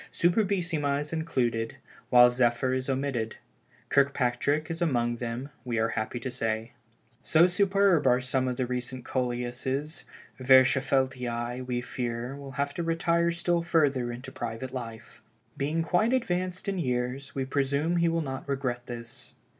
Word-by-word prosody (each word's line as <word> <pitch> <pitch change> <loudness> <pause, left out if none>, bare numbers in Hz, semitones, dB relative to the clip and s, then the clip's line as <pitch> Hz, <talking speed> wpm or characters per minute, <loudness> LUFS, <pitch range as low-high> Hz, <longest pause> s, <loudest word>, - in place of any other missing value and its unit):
Superbissima 170 -6 +1
is 150 +2 -5
included, 120 -8 -1 0.3
while 125 0 +7
Zephyr 120 +1 +2
is 130 +1 -2
omitted. 130 -4 -1 0.5
Kirkpatrick 140 +3 +1
is 165 +1 -5
among 120 -7 +1
them, 120 +3 -4
we 120 -3 -2
are 115 0 +2
happy 110 +2 -3
to 130 - -4
say. 115 -1 -2 0.5
So 160 +2 +5
superb 195 -3 +3
are 125 0 +5
some 130 0 0
of 125 -1 -2
the 130 - 0
recent 125 0 -4
Coleuses, 130 +4 -2 0.4
Verschaffeltii, 130 -2 +3
we 120 -1 -1
fear, 120 +1 -4
will 140 -1 -9
have 140 +2 -1
to 170 - -3
retire 170 +1 +1
still 170 0 0
further 145 -8 +1
into 125 +2 -8
private 120 +2 -5
life. 115 -3 -8 0.3
Being 155 +4 -1
quite 195 +9 +2
advanced 185 -7 -1
in 195 -2 -1
years, 125 -1 -2
we 135 -1 -1
presume 140 +5 0
he 170 0 +3
will 165 0 0
not 135 -1 -5
regret 130 -3 -2
this. 115 -1 -8
130 Hz, 145 wpm, -28 LUFS, 120-160 Hz, 0.5 s, while